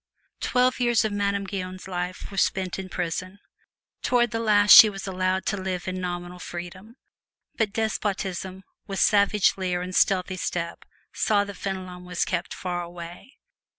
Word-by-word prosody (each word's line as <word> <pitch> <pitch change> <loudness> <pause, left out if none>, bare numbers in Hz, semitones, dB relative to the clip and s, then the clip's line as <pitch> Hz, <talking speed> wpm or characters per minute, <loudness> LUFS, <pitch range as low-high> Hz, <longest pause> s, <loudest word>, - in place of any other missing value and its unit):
Twelve 250 +1 +1
years 240 -3 +3
of 215 - -1
Madame 200 -1 0
Guyon's 185 -1 -6
life 180 +1 -5
were 195 - -9
spent 190 -1 0
in 190 -1 -6
prison. 185 +2 -4 0.6
Toward 240 -2 +2
the 225 - -2
last 210 -2 +4
she 220 - +11
was 195 -1 -7
allowed 185 0 -1
to 205 - -1
live 185 -1 -4
in 185 0 -3
nominal 175 0 -5
freedom. 180 +6 -8 0.6
But 220 -3 0
despotism, 195 -3 -3 0.2
with 195 - -4
savage 205 -1 +3
leer 180 -2 -1
and 185 0 -6
stealthy 185 -1 +2
step, 170 -1 -4 0.3
saw 205 -2 +2
that 200 0 -7
Fenelon 185 -2 -5
was 180 -1 -2
kept 180 -2 -2
far 180 -1 -3
away. 175 +8 -10
190 Hz, 155 wpm, -25 LUFS, 180-205 Hz, 0.6 s, she